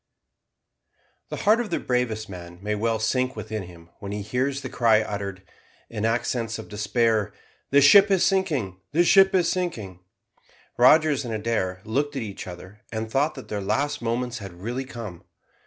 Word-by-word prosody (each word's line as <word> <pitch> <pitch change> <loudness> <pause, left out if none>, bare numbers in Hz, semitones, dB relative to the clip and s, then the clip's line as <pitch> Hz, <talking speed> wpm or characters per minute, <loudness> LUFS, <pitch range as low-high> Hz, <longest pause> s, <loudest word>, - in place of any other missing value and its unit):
The - - -4
heart 215 +3 +5
of 230 - -5
the 170 - -1
bravest 115 -4 -1
man 85 -2 -9
may 105 +2 -2
well 110 +2 0
sink 125 +4 0
within 110 0 -5
him 85 -2 -13
when 100 -1 -6
he 105 0 -4
hears 130 +5 -1
the - - -5
cry 110 -3 +3
uttered, 100 -3 -5 0.5
in 110 -1 -2
accents 115 0 -1
of 110 - -9
despair, 105 0 0 0.4
"The 140 +1 +5
ship 195 +9 +8
is 190 -3 +3
sinking, 145 - 0
the 170 +3 +4
ship 195 +2 +5
is 175 -2 +3
sinking!" 110 - -3 0.8
Rogers 145 +3 +5
and 120 - -5
Adair 105 -4 -2
looked 140 +6 -1
at 130 - -2
each 100 -3 -7
other, 95 +4 -10
and 110 -1 -4
thought 145 +5 +1
that 130 - -10
their 105 -1 -3
last 145 +9 -1
moments 120 +1 -2
had 100 -3 -8
really 120 +9 -4
come. 115 -9 -8
115 Hz, 170 wpm, -25 LUFS, 105-135 Hz, 0.8 s, ship